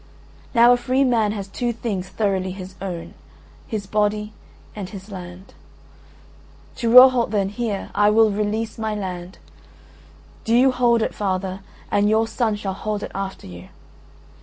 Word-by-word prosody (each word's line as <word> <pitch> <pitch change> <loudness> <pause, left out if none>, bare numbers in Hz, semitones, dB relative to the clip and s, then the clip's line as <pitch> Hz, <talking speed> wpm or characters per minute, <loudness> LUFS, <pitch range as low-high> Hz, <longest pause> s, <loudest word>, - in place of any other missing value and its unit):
Now 235 +1 +7
a - - +2
free 255 +2 +1
man 230 -5 +2
has 200 -2 -5
two 240 +4 -2
things 205 -5 -4
thoroughly 195 -3 -1
his 185 0 -8
own, 180 -4 -6 0.5
his 215 -3 -4
body 210 +1 -1 0.4
and 200 -3 -6
his 195 0 -10
land. 180 0 -10 1.2
To 235 - -1
Rohalt 250 0 +7
then, 200 -3 0
here, 210 -2 -4
I 205 0 +4
will 220 0 +4
release 215 +2 -2
my 220 -1 -2
land. 185 -2 -6 1.1
Do 225 - +1
you 260 +2 +5
hold 240 -3 +2
it, - - -2
father, 190 -1 -2 0.3
and 205 +1 +3
your 220 +1 +2
son 225 -2 -1
shall 200 -2 -4
hold 210 +1 -4
it - - -6
after 195 0 -5
you. 90 -1 -11
210 Hz, 155 wpm, -22 LUFS, 190-225 Hz, 1.2 s, Now